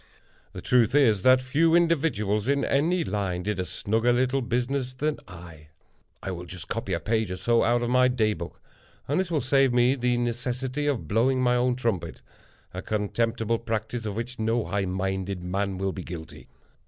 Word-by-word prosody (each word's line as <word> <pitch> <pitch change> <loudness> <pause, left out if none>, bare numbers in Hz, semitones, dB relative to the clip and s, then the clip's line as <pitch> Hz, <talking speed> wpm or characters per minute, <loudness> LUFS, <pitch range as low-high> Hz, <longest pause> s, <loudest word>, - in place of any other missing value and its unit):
The - - -8
truth 125 +1 +3
is, 115 -9 +4
that 130 +3 +5
few 160 +6 +3
individuals, 135 - +1
in 140 0 +1
any 165 +5 +1
line, 95 - -2
did 105 0 -2
a 90 - -1
snugger 110 +6 0
little 130 +2 +1
business 125 +2 -1
than 150 +3 -2
I. 85 -4 -12 0.6
I 95 - -3
will 90 -1 -6
just 90 -1 -8
copy - - -3
a - - 0
page 110 -1 0
or 90 - -4
so 120 +3 +2
out 120 +1 +2
of 120 - -1
my 125 0 +5
Day 110 -4 +1
Book; - - -8 0.5
and 145 +6 +1
this 190 -2 -1
will 155 -4 0
save 135 +1 +3
me 120 +1 +4
the 125 -2 0
necessity 125 +4 -2
of 125 - -1
blowing 125 - +2
my 125 -1 +3
own 125 0 +2
trumpet—a 115 -8 -6
contemptible 115 +2 -1
practice 110 0 -3
of 100 - -4
which 120 +3 -5
no 115 +1 0
high 100 -1 -1
minded 95 0 -3
man 95 +1 -2
will 95 +1 -1
be 95 - -6
guilty. 85 -2 -9
120 Hz, 185 wpm, -26 LUFS, 100-130 Hz, 0.6 s, that